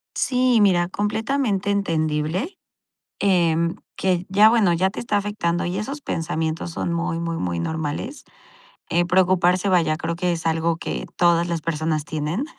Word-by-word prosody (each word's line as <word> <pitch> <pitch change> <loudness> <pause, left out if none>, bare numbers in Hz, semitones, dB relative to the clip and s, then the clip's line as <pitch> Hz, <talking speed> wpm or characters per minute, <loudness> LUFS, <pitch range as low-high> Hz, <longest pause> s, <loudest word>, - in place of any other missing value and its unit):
Sí, 255 -1 +2
y - - +5
mira, 180 -4 +3
completamente 210 +1 -1
entendible, 165 - -1 0.6
em, 170 -3 +2 0.2
que 185 -1 0
ya, 205 +3 +6
bueno, 220 -6 +3
ya 185 +3 +2
te - - -9
está 230 -3 -1
afectando 200 -4 -1
y 180 +2 -2
esos 275 +8 -4
pensamientos 160 - -3
son 170 - -2
muy, 165 0 -2
muy, 170 0 -3
muy 85 - -2
normales. 160 - -4 0.6
Eh, 175 +1 +2
preocuparse, 180 +1 +3
vaya, 170 -4 +2
creo 165 +1 -3
que 180 0 0
es 165 -1 -4
algo 165 0 +1
que - - -5
todas 170 -1 +3
las 170 -1 -2
personas 155 -1 -1
tienen, 155 - -2
175 Hz, 155 wpm, -22 LUFS, 165-200 Hz, 0.6 s, ya